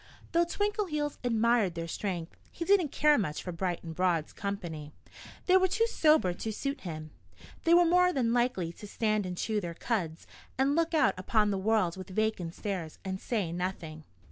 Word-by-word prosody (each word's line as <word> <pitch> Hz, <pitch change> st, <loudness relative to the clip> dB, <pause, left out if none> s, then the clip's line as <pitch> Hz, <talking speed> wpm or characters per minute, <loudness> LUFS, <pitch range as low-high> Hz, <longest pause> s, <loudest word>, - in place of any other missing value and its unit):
Though 340 Hz, +1 st, +3 dB
Twinkleheels 345 Hz, -6 st, -1 dB
admired 230 Hz, -5 st, +2 dB
their 165 Hz, 0 st, -4 dB
strength, 175 Hz, -1 st, -4 dB
he 335 Hz, -, -5 dB
didn't 370 Hz, -7 st, +3 dB
care 300 Hz, -2 st, +4 dB
much 155 Hz, -7 st, -2 dB
for 180 Hz, -, -4 dB
Bright 175 Hz, 0 st, -3 dB
and 165 Hz, -1 st, -6 dB
Broad's 170 Hz, -2 st, 0 dB
company. 170 Hz, -7 st, -5 dB, 0.5 s
They 370 Hz, 0 st, +6 dB
were 375 Hz, 0 st, +4 dB
too 425 Hz, +5 st, +2 dB
sober 310 Hz, -, +3 dB
to 220 Hz, +5 st, -4 dB
suit 275 Hz, +5 st, -3 dB
him. 155 Hz, -3 st, -6 dB, 0.5 s
They 335 Hz, +1 st, +6 dB
were 350 Hz, 0 st, +6 dB
more 360 Hz, +1 st, +4 dB
than 245 Hz, -7 st, +1 dB
likely 240 Hz, -9 st, 0 dB
to 210 Hz, -, -10 dB
stand 215 Hz, -2 st, 0 dB
and 180 Hz, -1 st, -5 dB
chew 215 Hz, +1 st, -1 dB
their 170 Hz, -2 st, -5 dB
cuds 170 Hz, -7 st, -2 dB, 0.3 s
and 270 Hz, +2 st, +2 dB
look 330 Hz, 0 st, +1 dB
out 305 Hz, -, +4 dB
upon 210 Hz, +2 st, +2 dB
the 195 Hz, -, -1 dB
world 195 Hz, -4 st, +1 dB
with 185 Hz, 0 st, -8 dB
vacant 190 Hz, -4 st, -1 dB
stares 185 Hz, -6 st, -4 dB
and 190 Hz, 0 st, -4 dB
say 205 Hz, -8 st, -1 dB
nothing. 170 Hz, -3 st, -4 dB
210 Hz, 185 wpm, -30 LUFS, 175-295 Hz, 0.5 s, They